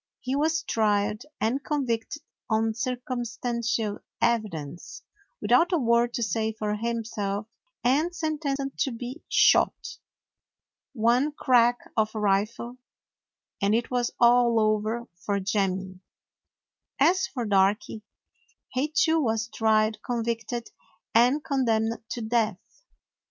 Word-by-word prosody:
He 255 +2 -2
was 315 +2 +1
tried 215 0 0
and 255 +5 0
convicted 275 0 -2 0.3
on 220 0 +1
circumstantial 235 -3 -2 0.2
evidence, 185 -10 -2 0.4
without 345 +2 +3
a 350 - +3
word 235 -2 +2
to 240 - -1
say 220 +1 -1
for 215 -1 -2
himself, 215 -3 -3 0.4
and 285 +8 +2
sentenced 290 -4 -3
to 270 - +1
be 245 +6 -7
shot. - - +3 0.9
One 245 +5 +2
crack 245 -4 +3 0.2
of 220 0 0
a - - -2
rifle, 210 +5 0 0.8
and 200 +2 +3
it 235 +2 -1
was 245 -1 +1
all 240 -1 +5
over 215 +2 0
for 200 +2 -2
Jemmy. 190 -2 -1 1.0
As 355 +7 +3
for 245 -3 -4
Darky, 205 +2 +1 0.7
he 260 +3 0
too 320 +1 +2
was 225 -4 0
tried, 215 -1 +2
convicted, 235 0 -3 0.4
and 250 +6 +4
condemned 230 -7 0
to 240 - -4
death. 220 -3 +1
235 Hz, 115 wpm, -26 LUFS, 215-255 Hz, 1.0 s, all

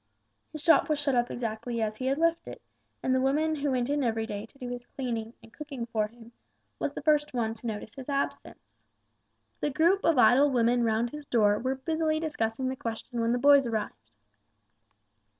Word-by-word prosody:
His 305 -1 -8
shop 325 -3 +5
was 305 - +2
shut 285 -1 0
up 240 -1 +1
exactly 235 0 -4
as 215 -1 -1
he 260 - -3
had 270 +1 +1
left 335 +1 +1
it, - - -8 0.4
and 260 - +1
the 260 - +2
woman 305 +4 +1
who 285 0 -1
went 250 -2 0
in 290 0 0
every 225 -2 0
day 210 0 -6
to 275 - -24
do 250 - -7
his 245 0 -7
cleaning 235 -3 -4
and 225 - -17
cooking 285 -6 -6
for 220 -2 -1
him, 230 +1 -16 0.5
was - - -2
the - - -7
first 300 -3 +2
one 225 -2 0
to 230 +1 -8
notice 215 -1 -5
his 265 +1 -9
absence. 280 0 -4 0.9
The - - 0
group 340 +8 +2
of 330 -4 +3
idle 270 +3 +6
women 240 -1 +2
round 230 +1 +1
his 300 -1 -9
door 210 -3 +3
were 260 +2 -1
busily 310 +3 -1
discussing 260 -6 -2
the 260 - -2
question 235 0 -5
when 230 0 +1
the 245 - +2
boys 280 0 +5
arrived. 215 - -4
250 Hz, 205 wpm, -28 LUFS, 230-290 Hz, 0.9 s, idle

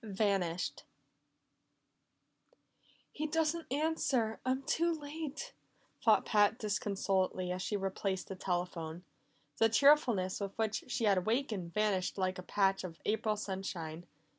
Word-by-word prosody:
18 205 -3 -7
Vanished 190 -4 0 2.3
"He 310 +1 -3
doesn't 320 0 0
answer! 275 -6 +1
I'm 260 +1 0
too 335 +5 +1
late," 310 - -5 0.5
thought - - +5
Pat 210 0 +4
disconsolately 195 -3 0
as 180 +1 -3
she 205 +3 -1
replaced 195 -1 -2
the 190 - -5
telephone. 175 -2 -3 0.5
The 225 - +5
cheerfulness 235 -7 +4
with 200 -1 -5
which 220 -1 -1
she 245 - -2
had 200 -3 +4
awakened 215 -4 -1
vanished 205 -4 +1
like 185 -1 -1
a - - -4
patch 195 +1 +1
of 170 -3 -7
April 215 0 +1
sunshine. 175 -5 -5
205 Hz, 125 wpm, -33 LUFS, 185-250 Hz, 2.3 s, thought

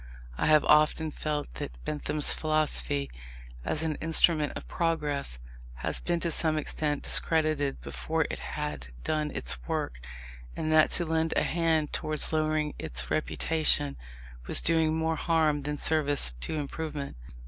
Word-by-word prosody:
I - - 0
have 155 -1 +5
often 155 +1 +4
felt 150 -1 -3
that - - -5
Bentham's 150 0 0
philosophy, 155 -2 0 0.5
as 155 - +1
an 155 -2 -1
instrument 160 -1 +3
of - - -7
progress, 150 - -1 0.5
has - - 0
been 175 -1 -1
to 170 - 0
some 155 0 +2
extent 150 -1 -1
discredited 155 -4 +2
before 65 -3 -2
it - - -5
had 75 -4 -4 0.2
done 155 -1 0
its - - -1
work, - - -2 0.6
and 155 - -2
that 155 0 +6
to 175 - -1
lend 160 0 0
a - - +3
hand 160 -3 +1
towards 155 +1 -1
lowering 155 -1 0
its 60 -4 -2
reputation 155 - +2 0.5
was - - +4
doing 160 -1 +3
more 160 0 0
harm 155 -3 +2
than 150 +1 -3
service 145 - +1
to 155 - -1
improvement. 150 -1 -4
155 Hz, 145 wpm, -28 LUFS, 145-160 Hz, 0.6 s, that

